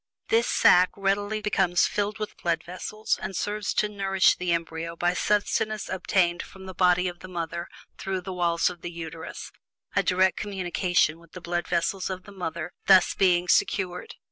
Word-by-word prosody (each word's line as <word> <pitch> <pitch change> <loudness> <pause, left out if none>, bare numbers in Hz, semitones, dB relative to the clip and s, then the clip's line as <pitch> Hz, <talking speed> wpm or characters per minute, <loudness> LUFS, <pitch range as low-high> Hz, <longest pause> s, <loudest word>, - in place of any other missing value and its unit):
This 230 +1 +3
sack 180 0 +5
readily 205 +2 0
becomes 190 -4 +2
filled 205 +1 -1
with 215 -1 -5
blood 165 -2 0
vessels, 215 +5 -3
and 190 0 -5
serves 210 +1 -2
to 210 - +2
nourish 195 -2 +2
the 180 -1 -2
embryo 165 0 -2
by 175 +1 +1
sustenance 210 +2 0
obtained 180 -2 +1
from 190 0 -12
the 190 - -7
body 180 0 +3
of 175 -1 -6
the 185 - -10
mother 170 -1 -4 0.3
through 190 -1 -3
the 185 +1 -6
walls 170 -2 +1
of 175 -2 -4
the 175 - -5
Uterus, 165 -1 -8 0.4
a 200 - +4
direct 185 0 +2
communication 180 -4 0
with 170 -2 -20
the 180 - -7
blood 175 0 -3
vessels 180 +3 -1
of 185 -1 -5
the 205 - -13
mother 170 -3 -5
thus 190 -1 +6
being 180 -2 +3
secured. 190 - 0
180 Hz, 175 wpm, -26 LUFS, 175-195 Hz, 0.4 s, thus